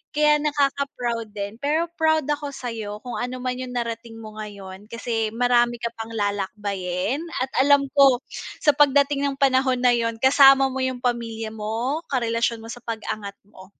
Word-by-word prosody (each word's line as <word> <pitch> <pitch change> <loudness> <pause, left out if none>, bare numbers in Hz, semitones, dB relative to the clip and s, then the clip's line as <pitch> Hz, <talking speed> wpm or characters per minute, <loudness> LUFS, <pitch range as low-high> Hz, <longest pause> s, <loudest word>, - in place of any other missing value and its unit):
Kaya 300 0 +4
nakaka 280 -2 0
proud 235 -2 -2
din 205 +3 -5
pero 315 +4 0
proud 315 -1 +3
ako 290 0 -2
sa'yo 230 -6 -6
kung 245 - -5
ano 250 +1 -3
man 250 0 -2
'yung 255 -1 -6
narating 230 -1 -4
mo 215 -1 -10
ngayon 200 -1 -9
kasi 225 -1 -2
marami 240 0 +3
ka 235 - -2
pang 225 0 -7
lalakbayin 200 +1 -2 0.2
at 265 - -4 0.2
alam 285 -1 +5
ko 275 -3 +5 0.4
sa 295 - +6
pagdating 285 0 +3
ng 275 - -2
panahon 260 -2 +2
na 250 - +6
yun 230 -1 0
kasama 270 0 +6
mo 265 - -4
'yung 260 -1 -2
pamilya 230 -2 -2
mo, 225 +7 -2
karelasyon 230 -2 -1
mo 225 - -10
sa 245 - -8
pag-angat 215 -3 -5
mo. 190 -2 -16
245 Hz, 170 wpm, -23 LUFS, 220-275 Hz, 0.4 s, sa